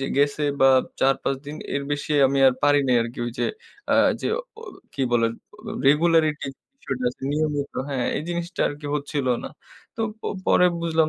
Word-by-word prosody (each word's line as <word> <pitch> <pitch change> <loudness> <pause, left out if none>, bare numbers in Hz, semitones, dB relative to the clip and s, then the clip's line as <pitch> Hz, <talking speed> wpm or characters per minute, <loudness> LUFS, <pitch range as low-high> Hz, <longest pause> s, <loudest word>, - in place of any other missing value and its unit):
যে 135 - -2
গেছে 145 +1 +2 0.2
বা, 135 - +7 0.3
৪-৫ 135 0 +2
দিনের 145 -1 -4
বেশি 145 +1 -3
আমি 135 +1 0
আর 130 - +5
পারি 145 0 +5
নাই 125 -1 +3
আরকি। 115 +1 -7
ওইযে 120 - -2 0.5
আ - - +5 0.3
যে - - -2 0.3
অ - - -10 0.3
কি 135 - -1
বলে? 115 -1 +3 0.4
র - - -5 0.2
রেগুলারিটির 155 -2 +2 0.3
বিষয়টা 130 - -4
আছে, 130 - -18
নিয়মিত 150 -2 -1 0.2
হ্যাঁ, 130 -3 -1
এই - - -2
জিনিসটা 175 +1 -4
আরকি 145 0 -7
হচ্ছিল 145 -2 -2 0.2
না। - - -4 0.5
তো - - -5 0.2
প - - -60 0.2
পরে 180 - +5
বুঝলাম 160 -1 +2
145 Hz, 175 wpm, -24 LUFS, 135-155 Hz, 0.5 s, বা